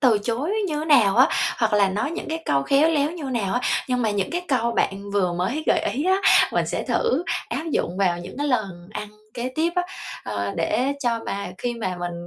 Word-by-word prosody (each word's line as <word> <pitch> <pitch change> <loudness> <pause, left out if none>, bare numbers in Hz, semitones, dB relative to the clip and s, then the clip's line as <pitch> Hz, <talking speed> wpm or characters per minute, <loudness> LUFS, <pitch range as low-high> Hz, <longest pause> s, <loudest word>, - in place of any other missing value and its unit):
từ 240 -6 +4
chối 240 - -2 0.2
như 300 - -2
thế 305 - -3
nào 240 -11 +5
á, 260 +3 +7 0.3
hoặc 225 -3 +1
là 200 -1 +4
nói 210 +10 -1
những 340 - -5
cái 320 +1 -3
câu 140 -1 +2
khéo 280 - +4
léo 300 -2 +2
như 335 -4 -7
nào 235 -7 -1
á, 245 - +1 0.3
nhưng 250 -1 +1
mà 220 - +1
những 200 -2 -1
cái 350 +1 -2
câu 235 -3 +1
bạn 200 -1 -1
vừa 185 -3 +1
mới 190 - -1
gợi - - +4
ý 285 +7 -2
á, 380 +1 +3 0.3
mình - - +1
sẽ - - -2
thử 460 -7 0 0.2
áp - - -3
dụng 180 -8 -1
vào 175 -3 +2
những 175 - -9
cái 290 - 0
lần 195 -9 -2
ăn 210 - -5 0.3
kế 245 +1 -3
tiếp 330 +2 +1
á, 360 - +3 0.4
ờ, 100 -2 -3
để 225 +12 +1
cho 235 -3 0
mà 200 -2 -4
khi 240 -1 -2
mà 185 -6 -3
mình 175 0 -3
235 Hz, 235 wpm, -23 LUFS, 195-290 Hz, 0.4 s, á